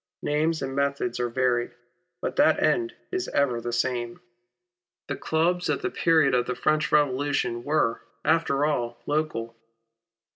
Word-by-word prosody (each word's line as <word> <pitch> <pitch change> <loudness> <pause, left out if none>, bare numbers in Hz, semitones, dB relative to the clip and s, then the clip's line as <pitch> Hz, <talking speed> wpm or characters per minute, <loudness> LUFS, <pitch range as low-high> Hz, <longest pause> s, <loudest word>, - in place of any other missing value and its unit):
Names 155 +2 0
and 135 0 -4
methods 140 -4 -1
are 120 0 0
varied, 120 -1 0 0.5
but - - -3
that - - +4
end 350 0 +1 0.2
is 370 0 -2
ever 125 -5 +1
the 120 - -4
same. 120 -1 -1 0.9
The - - -2
clubs 175 +3 0
at - - -1
the - - -1
period 160 -5 +3
of 125 -1 +2
the 125 - -2
French 155 +3 +1
Revolution 140 -4 +1
were, 145 -6 +1 0.2
after 155 -3 +2
all, 120 -6 -1
local. 145 -7 -2
140 Hz, 145 wpm, -26 LUFS, 120-155 Hz, 0.9 s, that